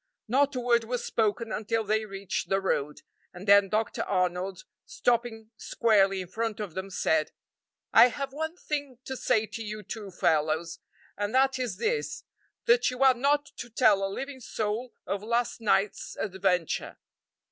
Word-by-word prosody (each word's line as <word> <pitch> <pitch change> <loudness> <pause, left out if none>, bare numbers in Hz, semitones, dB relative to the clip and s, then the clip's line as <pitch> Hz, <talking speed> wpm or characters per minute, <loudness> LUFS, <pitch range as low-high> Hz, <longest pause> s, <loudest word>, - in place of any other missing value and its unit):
Not 275 +4 +2
a - - -1
word 240 -1 +2
was 245 +1 -3
spoken 220 +1 0
until 225 +1 -1
they 215 +1 0
reached 195 -2 -4
the 195 - +2
road, 150 -6 -2 0.3
and 185 +3 -9
then 200 -1 +6
Dr. 215 +2 -1
Arnold, 185 0 -1 0.2
stopping 230 -2 -1
squarely 195 -4 +2
in 180 - -7
front 220 +3 -3
of 205 -6 -5
them, 190 +2 -5
said: 160 -4 +1 0.6
"I - - +9
have 275 +2 -5
one 315 +3 -3
thing 285 -6 -4
to 265 - -4
say 220 -3 +1
to 225 +1 -7
you 215 -1 -6
two 205 +1 -7
fellows, 160 -1 0 0.4
and 205 +3 -2
that 265 0 +3
is 240 -7 -2
this 440 - -2 0.4
that 475 0 +4
you 250 +1 -1
are 265 -1 +7
not 285 +4 +1
to 240 - -7
tell 215 -4 +4
a 195 - 0
living 270 +6 -6
soul 225 +1 -3
of 200 - -2
last 235 +2 -1
night's 205 -2 0
adventure. 185 -3 -1
220 Hz, 165 wpm, -28 LUFS, 195-245 Hz, 0.6 s, I